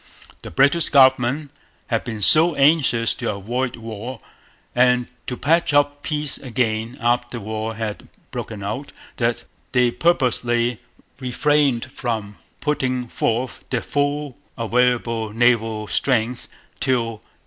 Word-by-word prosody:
The - - -8
British 140 - +3
government 130 +1 +4 0.3
had - - -1
been 110 -3 -5
so 160 - +6
anxious 135 -5 +3
to 120 -5 -3
avoid 120 +6 -2
war, 115 +2 -7 0.5
and 125 0 +3 0.2
to 125 - -3
patch 160 0 +2
up 145 0 +2
peace 150 -2 -1
again 115 -1 -2
after 120 0 0
war 110 +1 -4
had 110 -2 -5 0.2
broken 105 -3 -6
out, 110 +8 -4 0.3
that 120 0 0 0.3
they 125 -1 +4
purposely 120 -7 +1 0.4
refrained 135 0 +1
from 110 -6 -4 0.2
putting 130 -4 -1
forth 120 +3 -2
their 125 -3 -1
full 145 -1 -1 0.2
available 115 -1 +1
naval 115 -2 +2
strength 120 0 0 0.3
till 130 -2 +2
1813. 115 -2 -10
125 Hz, 120 wpm, -21 LUFS, 115-135 Hz, 0.5 s, so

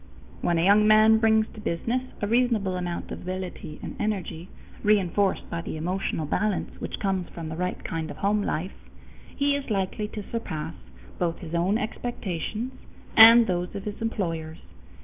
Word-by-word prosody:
When 170 -1 +1
a 165 - +2
young 210 +2 +6
man 215 +1 +6
brings 220 -1 +4
to - - -10
business 230 +9 -1 0.2
a - - +1
reasonable 225 -5 +2
amount 175 -1 -4
of - - -6
ability 185 -4 -6
and - - -6
energy, 190 -5 -3 0.3
reinforced 200 -1 +2
by 170 - -2
the 160 - -5
emotional 170 -1 -2
balance 200 +6 -1
which - - -4
comes 190 -3 -1
from 165 -2 -7
the 160 - -5
right 180 +2 -3
kind 160 -1 -3
of - - -8
home 205 +1 +1
life, 185 -1 -4 0.5
he 285 0 +2
is 285 -2 -4
likely 200 +1 -1
to 210 0 -7
surpass 160 -9 -4 0.5
both 170 -2 0
his 165 -2 -9
own 180 +5 +2
expectations 220 0 -4 0.4
and 230 +1 +10
those 180 -1 -2
of 200 - -4
his 210 +1 -6
employers. 165 -8 -2
195 Hz, 170 wpm, -26 LUFS, 170-215 Hz, 0.5 s, and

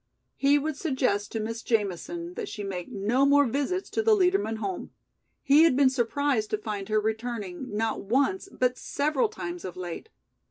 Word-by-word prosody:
He 280 +1 +4
would 295 0 -2
suggest 255 - 0
to 225 - -2
Miss 225 +1 -4
Jamison 245 - -2
that 425 +1 -5
she 210 - -6
make 185 -3 -5
no 220 +7 +1
more 285 +1 +5
visits 285 - -1
to - - 0
the 440 0 +5
Liedermann 365 - +2
home. 350 - -4 0.5
He 285 +3 +6
had 325 -5 +5
been 270 -1 +5
surprised 255 -2 0
to 215 - 0
find 210 -2 -5
her 215 0 +3
returning 220 -1 -3
not 225 0 -1
once 280 - 0
but 250 0 0
several 305 - 0
times 355 -5 -6
of 180 - -7
late. 180 - -6
260 Hz, 175 wpm, -27 LUFS, 215-315 Hz, 0.5 s, He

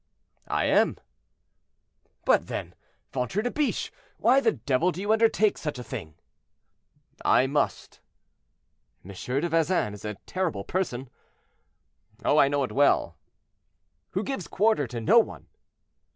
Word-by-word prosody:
"I - - 0
am." - - +3 1.3
"But - - +3
then, - - -5 0.4
ventre 130 - -1
de 245 - -1
biche, 300 -2 -1 0.3
why 255 +4 +4
the - - +2
devil 135 +9 +1
do 175 - -8
you 205 +3 +1
undertake 220 -2 +3
such 150 -4 -4
a 125 - -6
thing?" 80 -8 -7 1.1
"I 130 - +4
must." 145 +2 -2 1.1
"M. 100 - -9
de 135 - -2
Vezin 165 - +1
is 105 - -11
a 105 -1 -4
terrible 175 - -2
person." 130 - -3 1.1
"I 145 -1 +5
know 140 0 0
it 125 - -3
well." 140 +5 +2 1.0
"Who 195 - +1
gives 215 - -4
quarter 205 - +2
to 120 0 -5
no 205 - +5
one." 225 - -3
150 Hz, 130 wpm, -26 LUFS, 125-200 Hz, 1.3 s, I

